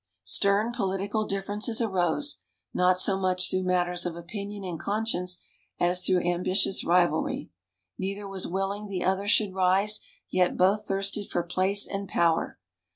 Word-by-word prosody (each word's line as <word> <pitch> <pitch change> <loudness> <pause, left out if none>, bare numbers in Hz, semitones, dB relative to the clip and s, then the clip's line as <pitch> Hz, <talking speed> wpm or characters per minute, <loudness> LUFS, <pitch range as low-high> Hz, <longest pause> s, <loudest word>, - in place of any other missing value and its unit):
Stern 205 +4 +2
political 200 +1 -1
differences 205 +4 -1
arose, 215 - +1 0.3
not 180 0 +3
so 195 0 +2
much 185 -1 +1
through 185 - +1
matters 180 -1 0
of 175 -2 -3
opinion 200 +4 -7
and 175 -4 -5
conscience, 190 -4 -2 0.4
as 180 +1 +1
through 180 -1 +2
ambitious 185 +2 +2
rivalry. 175 -2 +1 0.5
Neither 200 +2 -4
was 195 -1 -4
willing 195 +3 -3
the 190 -3 -3
other 190 +2 0
should 210 -2 +2
rise, 190 +3 +3 0.3
yet 180 -1 +1
both 200 +3 +2
thirsted 195 +1 -1
for 175 - -1
place 185 +3 +2
and 195 0 -5
power. 165 -1 +1
190 Hz, 145 wpm, -27 LUFS, 180-200 Hz, 0.5 s, not